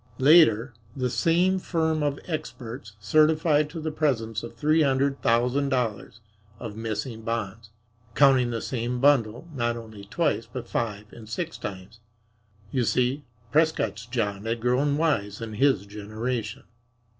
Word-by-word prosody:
Later 130 -5 +5 0.2
the 125 -2 -1
same 180 +6 +2
firm 160 -3 0
of 145 -1 0
"experts" 125 -8 -6
certified 155 - +3
to 165 - -7
the 155 0 -3
presence 125 -8 -1
of 115 0 -9
three 155 +6 +2
hundred 140 -1 +1
thousand 125 +4 +2
dollars 115 -4 -2 0.4
of 110 -2 -7
missing 115 +1 -4
bonds, 115 -1 -4 0.5
counting 135 -4 +5
the 115 -1 -3
same 125 0 -2
bundle, 135 0 +2
not 120 -3 -1
only 110 -3 -10
twice, - - -1
but - - -6
five 105 -2 -3
and 110 -2 -12
six 165 +7 -4
times! 95 +3 -8 0.7
You 130 - +1
see, 125 +4 0 0.3
Prescott's 115 -9 +1
John 105 -4 -2
had 115 +1 -1
grown 130 +5 +1
wise 110 -11 0
in 115 -2 -6
his 110 -3 +2
generation. 110 +4 -4
120 Hz, 140 wpm, -26 LUFS, 110-145 Hz, 0.7 s, Later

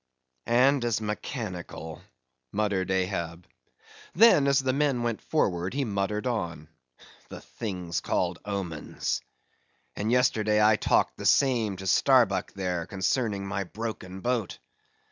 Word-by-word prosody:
"And 130 +3 +4
as 120 -3 0
mechanical," 105 - -5 0.5
muttered 100 -3 0
Ahab. 90 -3 -2 0.7
Then 175 -8 +6
as 140 -1 +4
the 130 -1 +1
men 140 -4 +1
went 115 -2 -2
forward, 95 - -1
he 140 -1 0
muttered 105 +1 -2
on: 85 -10 -3 0.6
"The - - -9
things 90 -6 -4
called - - -1
omens! 95 -6 -3 0.7
And 105 +3 -1
yesterday 110 -4 +3
I 105 0 +5
talked - - +1
the - - -7
same 115 -8 +3
to 95 - -8
Starbuck 105 -3 +3
there, 90 -3 -3
concerning 100 +1 -1
my 100 0 -2
broken 95 -2 -6
boat. 120 -5 -1
105 Hz, 125 wpm, -27 LUFS, 95-120 Hz, 0.7 s, Then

